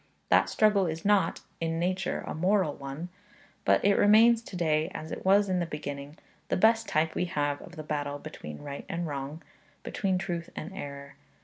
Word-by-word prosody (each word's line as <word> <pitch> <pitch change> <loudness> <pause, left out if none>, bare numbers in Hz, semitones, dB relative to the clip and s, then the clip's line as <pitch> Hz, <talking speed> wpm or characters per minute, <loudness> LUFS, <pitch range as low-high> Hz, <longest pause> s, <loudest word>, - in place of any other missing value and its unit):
That - - +4
struggle 210 -3 +3
is 160 +2 -4
not, 205 -1 +3 0.2
in 165 0 -1
nature, 185 +2 -1
a - - -4
moral 185 -1 +2
one; 140 +6 -7 0.6
but - - +3
it 200 0 +4
remains 225 +3 +6
to 220 - -10
day, 160 -2 +1
as 155 - -6
it - - -5
was 200 +2 +5
in 185 -1 +1
the 175 - -1
beginning, 145 -1 -6 0.3
the - - +1
best 225 +3 +4
type 160 +1 +1
we 180 - 0
have 145 -4 -1
of 175 - -12
the 155 - -6
battle 145 -1 -2
between 75 - -9
right 140 -1 -6
and 170 +1 -2
wrong, 145 +1 -5
and - - -31
between 190 -2 0
truth 170 -2 -3
and 170 +5 -6
error. 140 -5 -8
165 Hz, 195 wpm, -29 LUFS, 145-190 Hz, 0.6 s, remains